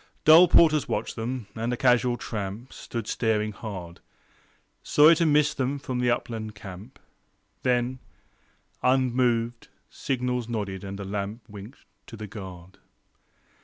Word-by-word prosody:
Dull 165 +4 +9
porters 155 -4 +5
watched - - -2
them, 120 +1 -4
and 115 +2 -2
a 125 - -2
casual 125 -1 +3
tramp 105 +3 -6
Stood 115 -3 -6
staring 110 -1 0
hard, 90 -5 -8 0.8
Sorry 150 +3 +6
to 165 - +2
miss 150 0 +3
them 135 0 -1
from 130 -2 -4
the 125 0 +2
upland 110 -3 -3
camp. 100 +4 -11 0.6
Then, 125 0 0 0.8
unmoved, 120 -2 +1 0.2
signals 125 -2 -2
nodded, 100 -4 -4
and 100 0 -6
a 100 - -5
lamp 100 +4 -5
Winked 105 +4 -12 0.2
to 115 - -10
the 110 - -6
guard. 95 -3 -10
120 Hz, 130 wpm, -26 LUFS, 105-130 Hz, 0.8 s, Dull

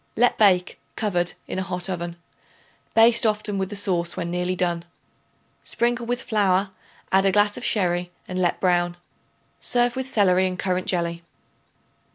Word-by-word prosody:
Let 245 +2 +3
bake, 185 -4 +3 0.2
covered, 175 -5 0
in - - -3
a - - -1
hot 180 -1 -3
oven. 175 -2 -4 0.8
Baste 230 +1 +6
often 210 -2 +1
with 190 -1 -2
the 205 - -6
sauce 175 -4 -1
when 170 0 -3
nearly 180 +1 -1
done. 175 -2 -1 0.8
Sprinkle 240 0 -1
with 245 +1 -1
flour; 200 -4 +1 0.4
add 195 +1 +4
a - - +3
glass 205 +1 +3
of 250 - -7
sherry 180 -3 0 0.2
and 185 0 -4
let 175 - +1
brown. 175 -1 +1 0.6
Serve 245 0 +1
with 260 0 -4
celery 190 -5 +3
and 185 0 -4
currant 185 0 -1
jelly. 170 -2 -1
190 Hz, 160 wpm, -23 LUFS, 180-215 Hz, 0.8 s, Baste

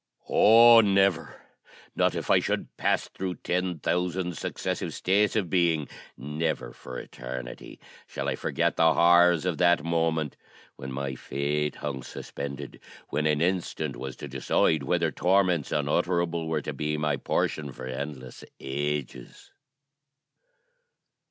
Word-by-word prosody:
Oh! 115 +2 +8
never 95 -5 +1 0.5
not - - +2
if - - -2
I - - +6
should - - -3
pass - - 0
through 95 -2 -5
ten 90 -1 -2
thousand 90 +2 -1
successive - - -4
states 100 +3 +2
of 105 -5 +1
being 85 -4 +1 0.3
never, 75 +3 -3
for 65 -1 -9
eternity, 60 -1 -8 0.3
shall - - -5
I - - 0
forget - - -1
the 80 -1 +4
horrors 85 -1 +5
of 90 -4 -1
that 85 -4 +4
moment, 80 -3 0 0.4
when 65 0 -8
my 70 0 -3
fate 75 +3 -2
hung 70 -2 -5
suspended 70 +2 -7 0.3
when 75 +1 0
an 75 0 +1
instant 90 +1 -1
was 65 -1 -6
to - - -8
decide 70 +3 +1
whether 70 - 0
torments 90 -5 +2
unutterable 85 +2 0
were 80 -2 -1
to 75 - -4
be 75 +2 -2
my 75 -1 0
portion 70 +1 -2
for 65 - -9
endless 65 0 -6 0.2
ages! 70 -2 -4
80 Hz, 130 wpm, -27 LUFS, 70-90 Hz, 0.5 s, Oh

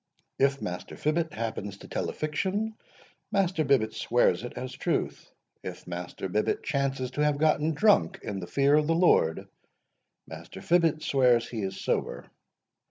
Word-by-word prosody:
If 140 0 +2
Master 90 0 -5
Fibbet 160 +1 0
happens 105 -3 -4
to - - -13
tell - - -2
a - - -5
fiction, 195 +8 -2 0.6
Master 185 -4 +1
Bibbet 130 -6 +2
swears 120 0 +2
it 120 - -6
as 130 0 -5
truth. - - -2 0.3
If - - -8
Master 90 +2 -5
Bibbet 105 +4 0
chances 135 -3 -1
to 150 - -1
have 150 -1 +2
gotten 155 +1 +2
drunk 205 0 +3
in 100 -2 -4
the 90 - -6
fear 140 +8 +2
of 150 0 +4
the 165 - +2
Lord, 165 - +3 0.8
Master - - -10
Fibbet 165 -3 +2
swears 125 -4 +3
he 115 -3 -4
is 95 0 -4
sober. - - -2
140 Hz, 160 wpm, -28 LUFS, 110-160 Hz, 0.8 s, of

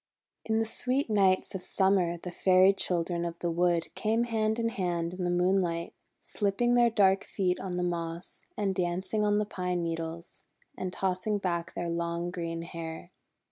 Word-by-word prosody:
In 220 0 +1
the 225 - +2
sweet 250 +3 0
nights 195 -3 +3
of 190 - -4
Summer 190 -3 +2
the 180 +1 -7
Fairy 185 +2 +5
Chil 180 -3 +1
dren 170 0 -2
of 170 0 -4
the 170 0 -2
Wood 170 0 +1
came 225 +2 +1
hand 220 -2 0
in 230 -1 0
hand 175 -5 -2
in 185 -1 -3
the - - +1
moonlight, 175 -1 +1 0.3
slipping 210 +4 0
their 240 -1 +5
dark 195 -3 +3
feet 180 -2 -1
on 185 -2 -4
the 180 0 -1
moss, 170 0 -4
and 200 -2 0
dancing 185 +3 -1
on 205 0 +3
the 210 - +1
pine 180 -3 -2
needles, 165 0 -5 0.3
and 185 -1 -4
tossing 190 +3 -1
back 170 -3 -2
their 175 - -2
long 170 +1 -2
green 165 -2 -4
hair. 170 0 -7
180 Hz, 180 wpm, -29 LUFS, 170-200 Hz, 0.3 s, Fairy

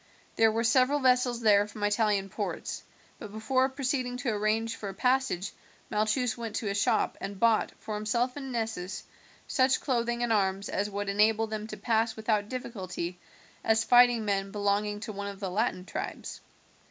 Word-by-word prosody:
There 225 -1 +5
were 225 +1 0
several 255 +5 +3
vessels 250 -2 +2
there 205 -2 +5
from 210 0 -8
Italian 205 -2 +1
ports, - - -4 0.4
but 210 - -8
before 255 +5 +1
proceeding 260 -2 -2
to 250 -1 -1
arrange 220 +2 0
for 205 - -6
a 195 - -8
passage 250 -6 +1 0.4
Malchus 220 +3 +1
went 230 -3 -6
to 210 - -2
a - - -1
shop 200 0 +1
and 195 -1 -5
bought, 230 -2 +3
for 215 - -6
himself 235 +4 0
and 270 -2 -6
Nessus, 220 -6 -3 0.4
such 260 -1 +2
clothing 240 -2 0
and 235 -1 +2
arms 195 -1 0
as 205 +1 -1
would 205 0 -4
enable 215 +2 +3
them 215 -1 -5
to - - -7
pass 225 -1 +1
without 215 -2 0
difficulty 185 -8 -5 0.4
as 220 0 +3
fighting 245 -2 +5
men 195 -1 0
belonging 205 +1 0
to 215 - -5
one 200 0 -5
of 200 -1 -7
the 195 -3 -3
Latin 185 -2 -1
tribes. - - -6
220 Hz, 175 wpm, -29 LUFS, 205-240 Hz, 0.4 s, There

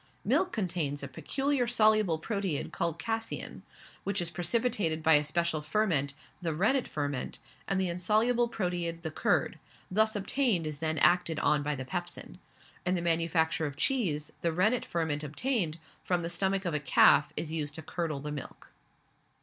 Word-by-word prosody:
Milk 370 - +2
contains 170 - -2
a - - -3
peculiar 270 - -1
soluble 215 -7 +3
proteid, 195 -3 -2
called 170 -1 -2
casein, 225 +7 -4 0.4
which 200 0 -1
is 170 -1 -2
precipitated 175 -2 0
by 160 - +6
a 150 0 +6
special 160 +1 0
ferment, 150 -7 +1 0.3
the 165 -3 -2
rennet 230 - +2
ferment, 145 -3 -3 0.3
and 195 -1 0
the 190 - +1
insoluble 215 +8 +2
proteid, 175 -5 -2
the 160 - -3
curd, - - 0 0.3
thus 220 +3 +3
obtained 205 - +1
is 150 -2 -4
then 160 -1 -1
acted 170 0 +4
on 150 -1 +3
by 150 +1 -1
the 130 -1 -6
pepsin. 175 +3 -5 0.4
In 180 +1 +1
the 175 - -1
manufacture 165 -1 +1
of 140 -1 -8
cheese, 155 - 0
the 170 - +1
rennetferment 170 -6 0
obtained, 170 - -1 0.3
from 175 -2 0
the 170 - -2
stomach 190 +2 0
of 170 - -1
a 150 - 0
calf 145 0 +5
is 155 - -2
used 150 -2 -2
to 160 - -7
curdle 160 -3 -3
the 150 +1 -5
milk. 145 -3 -8
170 Hz, 165 wpm, -30 LUFS, 155-205 Hz, 0.4 s, by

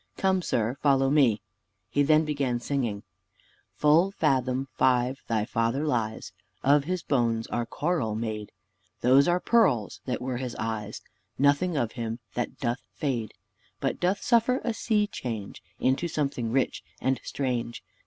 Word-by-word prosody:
Come, 190 -1 +2
sir, 120 -4 -1
follow 135 -2 +3
me." 120 -9 +3 0.4
He 145 - +1
then 155 +2 +4
began 140 -5 -1
singing, 120 -6 -2 0.7
"Full 155 +5 +4
fathom 135 -7 0
five 130 +1 +2
thy 110 -2 0
father 115 +7 0
lies; 115 -6 -2 0.3
Of 140 +1 +4
his 180 0 -2
bones 115 -4 +1
are 120 -1 -2
coral 145 -7 -1
made; 110 -2 -4 0.5
Those 130 +3 +5
are 175 +1 +3
pearls 140 - +2
that 125 - -2
were 125 0 -3
his 125 -1 -4
eyes: 110 -2 -4 0.4
Nothing 145 +5 +2
of 120 -4 0
him 115 -2 -4 0.2
that 120 - -3
doth 120 0 -2
fade 120 -8 -2 0.4
But - - -1
doth 185 +3 0
suffer 240 +2 +3
a 235 - 0
sea 215 -2 +1
change 115 - -6 0.2
Into 135 +6 +1
something 140 -7 -2
rich 130 +1 0 0.2
and 130 -2 0
strange. 120 -3 -3
130 Hz, 145 wpm, -27 LUFS, 115-150 Hz, 0.7 s, Those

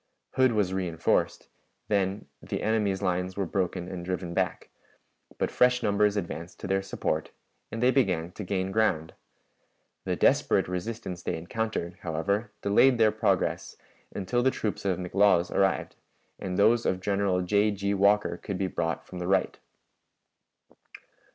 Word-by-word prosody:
Hood 130 -2 +3
was 105 -4 +1
reënforced; 85 -3 0 0.4
then 100 -1 0 0.2
the - - -4
enemy's 105 -3 0
lines 90 0 -1
were 100 - 0
broken 90 -1 -2
and 90 -2 -6
driven 90 -1 -3
back, - - -2 0.7
but - - -1
fresh 125 0 +3
numbers 105 -1 +2
advanced 85 -2 -5
to - - -7
their 95 0 +1
support, 80 -5 -2 0.4
and 115 +2 -3
they 125 - +5
began 90 -11 +1
to 105 - -7
gain 95 0 -2
ground. 90 -7 +1 0.9
The - - 0
desperate - - +3
resistance 90 0 -4
they - - -2
encountered, 90 0 -3
however, 100 +7 -1
delayed 120 +6 +5
their 110 -2 +5
progress - - 0 0.4
until 105 +5 -1
the 130 - +4
troops 105 -5 -3
of 95 -2 +1
McLaws 90 -1 +2
arrived, 95 -1 0 0.4
and 90 -1 -4
those 115 +3 +4
of 90 - 0
General 100 -1 0
J. 100 +3 +3
G. 100 0 -1
Walker 100 -2 +3
could 100 0 -5
be 95 - 0
brought 85 -3 -2
from 90 - -8
the 90 - -3
right. 95 0 +1
95 Hz, 150 wpm, -28 LUFS, 90-105 Hz, 0.9 s, they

